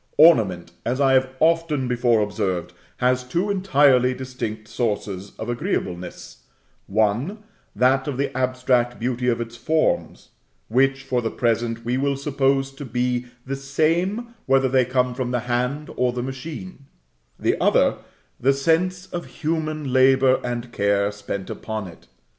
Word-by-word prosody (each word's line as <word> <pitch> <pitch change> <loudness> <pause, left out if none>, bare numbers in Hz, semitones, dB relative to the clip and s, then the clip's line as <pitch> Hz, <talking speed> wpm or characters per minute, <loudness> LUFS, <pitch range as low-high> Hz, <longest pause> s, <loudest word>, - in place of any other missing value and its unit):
Ornament, 100 - +5
as 125 +3 -1
I 135 -1 +4
have 130 0 +3
often 160 -5 +2
before 120 -2 +2
observed, 95 -4 -2 0.2
has 125 0 +2
two 170 +11 -1
entirely 140 -9 +4
distinct 125 -4 -5
sources 105 -4 -3
of 110 - -5
agreeableness: 120 - -4 0.5
one, 110 - 0 0.3
that 130 +3 +3
of 140 -3 -3
the 140 -1 -2
abstract 125 -1 +1
beauty 125 +1 -1
of 120 -1 +2
its 115 0 -5
forms, 160 +5 0 0.4
which, 135 +3 +2
for 130 -2 0
the 115 - -1
present, 115 -1 -1
we 125 +2 0
will 140 0 0
suppose 135 -1 +1
to 135 +1 -9
be 125 0 -1 0.2
the 135 +1 -3
same 170 - 0
whether 135 0 +4
they 130 -1 +3
come 125 0 +1
from 125 -1 -3
the 125 -1 -1
hand 125 +5 -2
or 125 -1 +1
the 120 0 -3
machine; 140 +4 -7 0.5
the - - +1
other, - - +3 0.4
the 135 +3 +3
sense 175 +6 +1
of 175 -2 -6 0.2
human 155 -3 -1
labor 130 0 +5
and 120 0 -4
care 100 -1 +1
spent 100 -1 -5
upon 110 -2 -5
it. 85 - -13
130 Hz, 145 wpm, -23 LUFS, 120-140 Hz, 0.5 s, Ornament